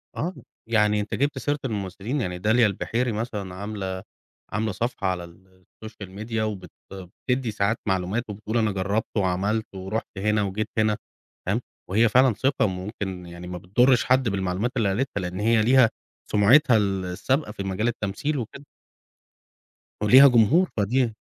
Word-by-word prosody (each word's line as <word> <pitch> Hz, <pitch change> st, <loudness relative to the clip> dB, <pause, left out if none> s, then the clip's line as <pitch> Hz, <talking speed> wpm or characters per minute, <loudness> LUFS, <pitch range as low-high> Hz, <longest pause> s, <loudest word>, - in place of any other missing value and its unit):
آه، 175 Hz, +5 st, -2 dB, 0.3 s
يعني 105 Hz, -2 st, +3 dB
أنت 105 Hz, -, -3 dB
جبت 140 Hz, +1 st, 0 dB
سيرة 145 Hz, +2 st, -1 dB
الممثلين، 105 Hz, +4 st, -3 dB
يعني 90 Hz, -2 st, -3 dB
داليا 110 Hz, +5 st, +3 dB
البحيري 115 Hz, +4 st, -1 dB
مثلًا 105 Hz, -4 st, -4 dB
عاملة، 95 Hz, -2 st, -5 dB, 0.5 s
عاملة 110 Hz, 0 st, 0 dB
صفحة 120 Hz, +2 st, -2 dB
على 90 Hz, -2 st, -1 dB
ال 95 Hz, +2 st, -17 dB, 0.2 s
الsocial 110 Hz, -3 st, -9 dB
media 110 Hz, +1 st, -5 dB
وبت 100 Hz, -5 st, -3 dB, 0.6 s
بتدي 125 Hz, -2 st, 0 dB
ساعات 105 Hz, +2 st, 0 dB
معلومات، 95 Hz, +5 st, 0 dB
وبتقول 105 Hz, +3 st, -3 dB
أنا 110 Hz, -2 st, +2 dB
جربت 100 Hz, +4 st, -2 dB
وعملت، 100 Hz, +3 st, 0 dB
ورُحت 95 Hz, +4 st, -3 dB
هنا 105 Hz, +2 st, +1 dB
وجيت 100 Hz, +2 st, -2 dB
هنا، 110 Hz, 0 st, +2 dB, 0.5 s
تمام، 105 Hz, +6 st, 0 dB, 0.3 s
وهي 110 Hz, +4 st, +4 dB
فعلًا 125 Hz, +1 st, +5 dB
ثقة، 130 Hz, 0 st, +1 dB
ممكن 95 Hz, -1 st, -5 dB
يعني 85 Hz, +1 st, -9 dB
ما 90 Hz, -, -5 dB
بتضرش 120 Hz, +9 st, +3 dB
حد 130 Hz, -2 st, +3 dB
بالمعلومات 95 Hz, +4 st, -1 dB
اللي 110 Hz, -4 st, +2 dB
قالِتها، 100 Hz, 0 st, -1 dB
لإن 90 Hz, +1 st, -4 dB
هي 110 Hz, +1 st, +3 dB
ليها 125 Hz, +1 st, +5 dB, 0.4 s
سمعتها 115 Hz, +5 st, +5 dB
ال 100 Hz, -3 st, 0 dB
السابقة 120 Hz, -, -1 dB
في 100 Hz, -2 st, -6 dB
مجال 95 Hz, +4 st, -1 dB
التمثيل 120 Hz, +6 st, -2 dB
وكده. 130 Hz, +4 st, -7 dB, 1.4 s
وليها 130 Hz, +6 st, +9 dB
جمهور، 130 Hz, -, +4 dB
فدي 115 Hz, +3 st, +1 dB
105 Hz, 150 wpm, -25 LUFS, 95-120 Hz, 1.4 s, وليها